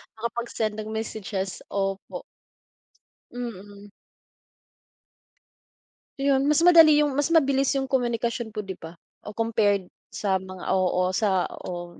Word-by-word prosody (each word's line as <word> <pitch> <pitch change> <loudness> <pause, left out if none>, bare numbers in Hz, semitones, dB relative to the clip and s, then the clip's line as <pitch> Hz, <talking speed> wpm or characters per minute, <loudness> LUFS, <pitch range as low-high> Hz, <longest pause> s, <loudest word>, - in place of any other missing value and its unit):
makapag-send 230 -1 -3
ng 215 - -5
messages, 205 -3 -4
opo. 195 -1 -3 1.1
Mm. 205 -4 -8 2.3
Ayun 275 0 +2
mas 300 +2 +3
madali 330 -3 +9
'yung 295 - 0
mas 285 +2 0
mabilis 275 -3 +3
'yung 270 -1 -2
komunikasyon 235 -2 -1
po 210 - -3
'di 190 -2 -8
ba, 165 +1 -10 0.3
o 210 - -7
compared 215 -3 +1 0.2
sa 195 -2 -1
mga 185 -1 -10
oo 185 -1 +1
sa 190 -2 +1 0.2
o 175 -1 -7
215 Hz, 115 wpm, -25 LUFS, 190-245 Hz, 2.3 s, madali